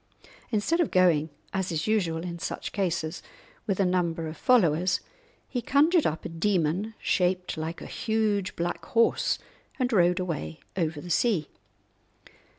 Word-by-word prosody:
Instead 230 +10 +1
of 340 - +2
going, 170 -4 +3 0.2
as 190 -1 -1
is 160 -1 -1
usual 175 -7 0
in 170 -1 -5
such - - -4
cases, 165 -5 -2 0.5
with 195 -2 0
a 195 - +4
number 170 -2 0
of 155 - -6
followers, 180 -4 +3 0.5
he 245 - -2
conjured 305 +7 +4
up 155 +1 -3
a - - -3
demon 185 +3 0
shaped 180 0 0
like 160 +1 -4
a - - -8
huge 215 -3 -1
black 170 0 -2
horse, 230 +6 +2 0.4
and 250 -2 0
rode 180 -2 +4
away 150 - -4 0.2
over 160 -4 -1
the 175 +3 -7
sea. 185 -5 +2
180 Hz, 150 wpm, -27 LUFS, 165-210 Hz, 0.5 s, a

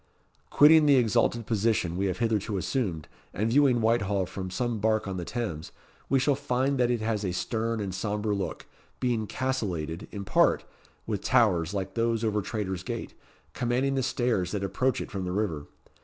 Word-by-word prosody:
Quitting 150 +1 +6
the 140 - +6
exalted 120 -1 +2
position 105 -6 0
we 95 +2 0
have 90 - -2
hitherto 110 -3 0
assumed, 95 - -2 0.3
and 110 +4 0
viewing 130 -3 +4
Whitehall 105 -4 +1
from 95 +1 -6
some 120 +3 -2
bark 110 0 +1
on 95 -1 -3
the 90 - -4
Thames, 100 -10 -4 0.4
we 135 - +4
shall 135 +2 +3
find 135 0 0
that 120 -1 +3
it 120 -2 0
has 110 -1 -1
a 95 - -1
stern 115 +5 -2
and 100 -3 -3
sombre 105 +2 -1
look, 100 -2 -4 0.3
being 120 -4 0
castellated, 100 -11 -3
in 100 -2 -6
part, - - +3 0.4
with - - -2
towers 85 +3 +2
like 95 -1 -3
those 115 -1 0
over 105 -2 +1
Traitor's 95 -2 -3
Gate, 115 +4 -5 0.4
commanding 125 +3 0
the 135 - +1
stairs 120 -8 0
that 100 -1 -2
approach 125 +5 0
it - - -7
from 95 -2 -3
the 90 - -3
river. 90 -7 -2
110 Hz, 180 wpm, -27 LUFS, 95-120 Hz, 0.4 s, Quitting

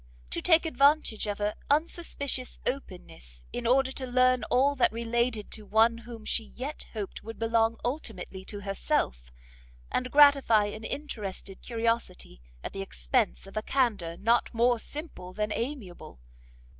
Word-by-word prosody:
to - - -1
take 330 -1 +5
advantage 280 -6 +3
of 205 -1 -2
her 210 0 0 0.2
unsuspicious 285 -4 -1
openness - - -5
in 240 -1 -2
order 260 +2 +3
to 260 -1 -4
learn 255 0 +3
all 275 +3 +3
that 260 - +3
related 230 -1 -1
to 220 - -7
one 225 +3 +3
whom 230 -2 -10
she 225 - 0
yet 265 +7 -7
hoped 210 -4 -5
would 225 +1 -8
belong 225 0 +2
ultimately 220 -8 -4
to 205 +1 -7
herself, 195 - -1 0.6
and 255 0 0
gratify 275 -7 +6
an 215 +2 -6
interested 205 -9 -5
curiosity 230 - -2 0.2
at - - -5
the 195 - -4
expence 220 +3 0
of 195 - -13
a 215 - 0
candour 215 -10 0
not 230 +3 +2
more 240 +1 +3
simple 290 - -7
than 210 +1 -2
amiable? 210 - -5
230 Hz, 145 wpm, -29 LUFS, 205-260 Hz, 0.6 s, gratify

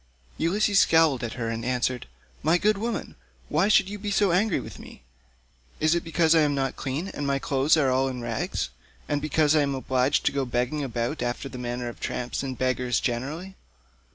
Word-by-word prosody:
Ulysses 200 +4 +3
scowled 160 -6 +4
at 115 - -3
her 115 -3 -3
and 115 0 -3
answered, 125 0 -1 0.3
"My 160 +3 +3
good 210 +2 +2
woman, 230 +2 -3 0.4
why 170 +6 +2
should 215 -2 +4
you 205 +1 -6
be 205 +1 -4
so 200 -2 +2
angry 190 +2 +2
with - - -9
me? - - -13 0.8
Is 155 +1 +3
it 170 - 0
because 165 0 +3
I 165 - +5
am 145 -2 +2
not 135 -1 -1
clean, 145 +8 -3
and 145 -6 -4
my 140 0 +1
clothes 140 +3 +2
are 135 -4 +3
all 130 +1 +2
in 130 -2 -4
rags, 115 - -3 0.4
and 145 0 -1
because 155 +1 +2
I 155 - +5
am 140 -1 0
obliged 130 +1 +1
to - - +3
go 140 -1 -1
begging 125 +4 -1
about 120 +2 -2
after 120 +3 -2
the 130 -2 -8
manner 120 0 -3
of 120 - -7
tramps 125 0 -3
and 130 -2 -4
beggars 130 -1 0
generally? 150 +11 -3
140 Hz, 205 wpm, -26 LUFS, 125-165 Hz, 0.8 s, I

